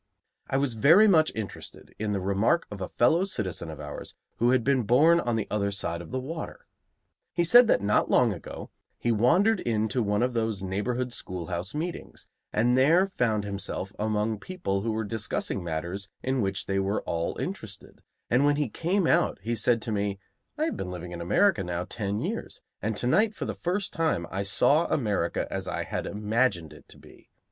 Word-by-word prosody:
I 135 - 0
was 135 -3 +1
very 165 - +6
much 160 -6 +4
interested 110 -3 -7
in 105 -1 -1
the 100 - 0
remark 100 - +1
of 100 -2 -7
a 90 - -3
fellow 160 +9 +3
citizen 100 - -3
of 80 -2 -8
ours 75 -1 -8 0.2
who 120 - +3
had 125 -2 +3
been 135 0 +2
born 145 +10 +5
on 120 -8 -1
the 110 - -1
other 100 -1 0
side 85 -4 -3
of 85 - -10
the 130 - -2
water. 160 +5 -7 0.7
He 175 - +2
said 240 +8 +7
that 100 - +3
not 105 - +2
long - - +4
ago - - -9 0.3
he 120 - 0
wandered 180 - +3
into 110 0 0
one 105 +1 +1
of 125 0 0
those 110 -4 -1
neighborhood 120 +6 -2
schoolhouse 90 - -4
meetings, 170 +3 -5 0.2
and 120 +3 +2
there 160 +8 +5
found 115 - 0
himself 100 -1 -5
among 110 0 0
people 135 - -3
who 115 +2 -1
were 110 +1 -1
discussing 105 -3 -3
matters 85 +5 -4
in 130 -1 0
which 95 -1 -1
they 95 0 0
were 95 +2 -1
all 85 0 -2
interested; - - -7 0.3
and 125 +4 +3
when 145 0 +4
he 145 -4 -1
came 180 - 0
out 170 +1 +2
he 115 +2 -1
said 115 +1 +1
to 115 - -3
me: 100 -1 -1 0.4
"I 310 - +1
have 325 - -2
been 90 - -4
living 90 -1 -7
in 85 -1 -6
America 175 - +3
now 90 0 -3
ten 105 -3 -3
years, - - -5 0.2
and 110 +1 -2
to - - -1
night 210 - +3
for - - -4
the - - -3
first 185 +3 -2
time 160 - 0
I 95 - -2
saw 140 - +3
America 105 - 0
as - - -3
I - - -2
had - - -4
imagined 105 - 0
it - - -16
to - - -13
be. - - -18
110 Hz, 200 wpm, -27 LUFS, 100-145 Hz, 0.7 s, said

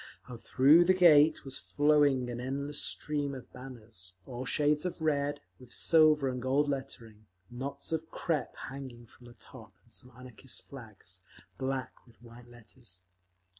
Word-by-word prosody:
Now 125 - -8
through 140 +8 +5
the 185 +1 +4
Gate 160 -5 +5
was 135 -1 -4
flowing 145 -3 +2
an 120 0 -5
endless 140 +3 -2
stream 145 -2 -1
of 130 - -11
banners, 115 -8 -11
all 125 0 -6
shades 150 +1 +1
of 180 -1 -4
red, 145 -2 0 0.2
with 125 -2 -15
silver 155 -2 +4
and 125 -1 -3
gold 135 +3 +1
lettering, 115 -6 -6 0.2
knots 140 +4 -6
of 160 0 -3
crepe 155 -6 -2
hanging 130 -3 -9
from 120 +2 -18
the 120 - -15
top—and 115 -3 -15
some 125 - -9
Anarchist 125 0 -8
flags, 110 -8 -11 0.4
black 130 -1 -2 0.2
with 120 - -22
white 120 0 -15
letters. 115 -5 -11
130 Hz, 150 wpm, -31 LUFS, 120-145 Hz, 0.4 s, through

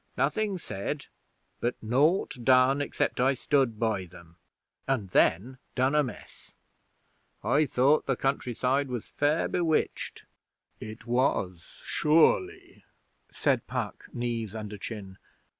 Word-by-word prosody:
Nothing 185 +10 0
said, 100 - -5 0.5
but 120 +1 -1
naught 140 - +2
done 130 +2 +5
except 140 - -1
I 135 +2 +3
stood 130 -4 +1
by 110 -5 0
them, 85 -1 -16 0.5
and 115 -9 -1
then 125 +10 +2 0.2
done 130 +2 +2
amiss. 150 -4 -3 0.9
I 150 +1 +3
thought 135 +4 +3
the 135 - +2
countryside 135 +1 0
was 125 -4 -4
fair 150 +3 +1
bewitched.' 165 -3 -1 0.6
'It 110 +1 -9
was, 120 -8 -1
sure 155 +2 +4
ly,' 385 +3 -14 0.5
said - - 0
Puck, - - -4
knees 115 -4 -3
under 105 -1 -6
chin. 100 -3 -7
130 Hz, 115 wpm, -28 LUFS, 110-145 Hz, 0.9 s, done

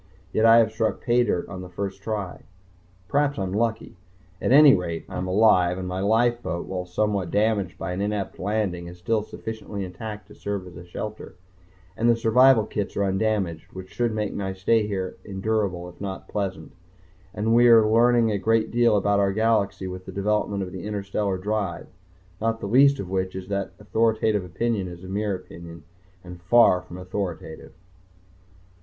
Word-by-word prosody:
Yet 110 +1 +4
I 115 0 +8
have 110 -2 +4
struck 110 0 -2
paydirt 120 -7 +1
on 95 -2 -7
the 90 - -9
first 95 +2 -5
try. 100 -3 -4 0.7
Perhaps 145 +3 +1
I 95 - -1
am 95 0 -3
lucky. 110 -2 -2 0.4
At - - 0
any 145 0 +8
rate 85 -3 -2
I - - -9
am 90 +1 -3
alive, 90 -3 +4
and 95 -1 -5
my 90 +1 -3
lifeboat, 110 -3 +1
while 90 -1 -5
somewhat 100 -1 -1
damaged 105 -4 0
by - - -4
an 95 - -3
inept 105 -1 -3
landing, 95 -4 -2
is 90 +1 -10
still 110 +5 0
sufficiently 110 -2 -6
intact 105 +3 -8
to - - -13
serve 100 -2 -4
as 90 -1 -12
a 85 - -9
shelter, 105 +2 -7 0.6
and 115 +1 +2
the 120 - +5
survival 115 +1 +5
kits 105 -2 -4
are 100 - +2
undamaged, 95 -4 -1
which 95 0 -9
should 120 -1 0
make 105 -1 -2
my 95 -1 -3
stay 105 +3 +1
here 95 -3 -4
endurable 95 -3 -2
if 90 - -14
not 95 -1 -6
pleasant... 100 -2 -4 0.6
and 110 +3 0
we 120 +1 +6
are 115 -2 +7
learning 115 0 +4
a 100 - -1
great 110 +2 +1
deal 120 -2 +3
about 100 0 +2
our 100 -1 +2
galaxy 105 -2 +1
with 95 0 -7
the - - -6
development 100 0 -1
of 90 - -7
the 95 -1 -7
interstellar 100 -1 -2
drive 100 -1 -3 0.6
not 115 0 0
the - - -5
least 140 +5 +5
of 100 - -4
which 95 0 -2
is 95 0 -7
that 100 -1 -3
authoritative 110 -1 +1
opinion 100 +3 -2
is 90 0 -10
mere 100 +2 -2
opinion 85 -2 -11 0.4
and 90 -1 -11
far 95 -1 +5
from 90 0 -11
authoritative. 90 -3 -6
100 Hz, 180 wpm, -24 LUFS, 95-110 Hz, 0.7 s, I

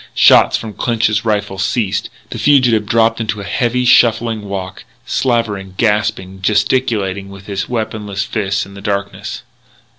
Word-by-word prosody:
Shots - - +6
from 110 -2 -7
Clinch's 110 -2 0
rifle 105 -3 -1
ceased; 100 0 -1 0.2
the - - -5
fugitive 125 -7 +3
dropped 115 +1 +2
into 110 -1 -2
a - - -6
heavy, 125 +4 0
shuffling 115 -3 +3
walk, 95 -2 -6 0.2
slavering, 105 -7 -1
gasping, 100 -4 0
gesticulating 100 -2 0
with 100 0 -12
his 100 -1 -4
weaponless 105 -4 -3
fists 105 -2 -2
in 100 - -14
the 100 - -10
darkness. 100 -1 -4
105 Hz, 140 wpm, -16 LUFS, 100-115 Hz, 0.2 s, Shots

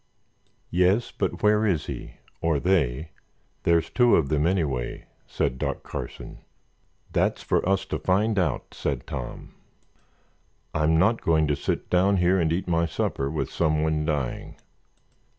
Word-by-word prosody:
"Yes, 90 +7 +2
but - - -3
where 105 +1 +4
is 95 -8 +1
he—or 80 -3 -4
they? 80 -4 +1 0.5
There's 85 -1 +2
two 120 -2 +5
of 70 -5 +1
them, 75 +2 +2
anyway," 75 -10 -1 0.2
said 65 - -1
Doc - - -2
Carson. - - -7 0.7
"That's - - 0
for - - +1
us 95 0 +1
to - - -3
find 105 +3 +1
out," 85 -7 -1
said 70 -4 -3
Tom. - - -7 1.2
"I'm 80 +1 +2
not 110 +7 +3
going 80 -1 +3
to 75 - +2
sit 70 - -2
down 95 +2 +3
here 90 +1 +3
and 80 -2 +1
eat 90 +3 -1
my 85 -1 +2
supper 70 -3 -2
with 70 -3 -3
someone 75 -1 +1
dying." 75 -5 -3
85 Hz, 140 wpm, -25 LUFS, 75-95 Hz, 1.2 s, two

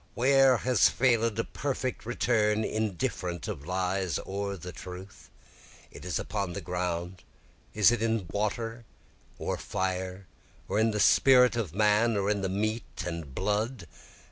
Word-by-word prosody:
Where 135 0 +5
has 125 -3 +3
fail'd 115 -3 +2
a 115 - +1
perfect 130 -4 -4
return 110 -3 +1
indifferent 90 -5 -2
of 70 - -6
lies 95 0 -1
or 100 0 -4
the 90 +1 -8
truth? 90 +2 -10 0.6
Is 90 -5 -4
it - - -2
upon 100 -4 -3
the 100 - -4
ground, 90 0 -3 0.5
or 105 - -5
in 115 -2 +3
water 115 +3 -2 0.5
or - - -3
fire? 95 0 -3 0.4
or 105 - 0
in 110 +1 +3
the 105 -1 -2
spirit 125 +3 +6
of 100 -9 -3
man? 105 +2 +3
or 100 +1 +1
in 100 -1 -1
the 95 - -1
meat 110 +4 -3
and 85 -6 -6
blood? 105 +2 -1
105 Hz, 145 wpm, -28 LUFS, 90-115 Hz, 0.6 s, spirit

